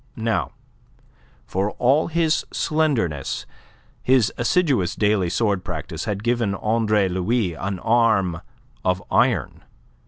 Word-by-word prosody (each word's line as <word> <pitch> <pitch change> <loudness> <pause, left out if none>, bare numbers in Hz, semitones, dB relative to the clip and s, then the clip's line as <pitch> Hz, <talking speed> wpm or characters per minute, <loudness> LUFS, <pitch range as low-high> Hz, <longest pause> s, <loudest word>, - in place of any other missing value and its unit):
Now, 115 0 -1 0.9
for 100 +3 -2
all 135 +6 +2
his 165 -1 +1
slenderness, 130 - -1 0.6
his 125 -4 +3
assiduous 120 - +1
daily 105 -4 +1
sword 100 -1 0
practice - - -5
had 105 0 -3
given 120 -4 0
Andre 110 -1 +1
Louis 95 +2 0
an 95 +3 -4
arm 105 -5 +2 0.4
of 90 0 0
iron. - - +1
110 Hz, 105 wpm, -22 LUFS, 95-120 Hz, 0.9 s, his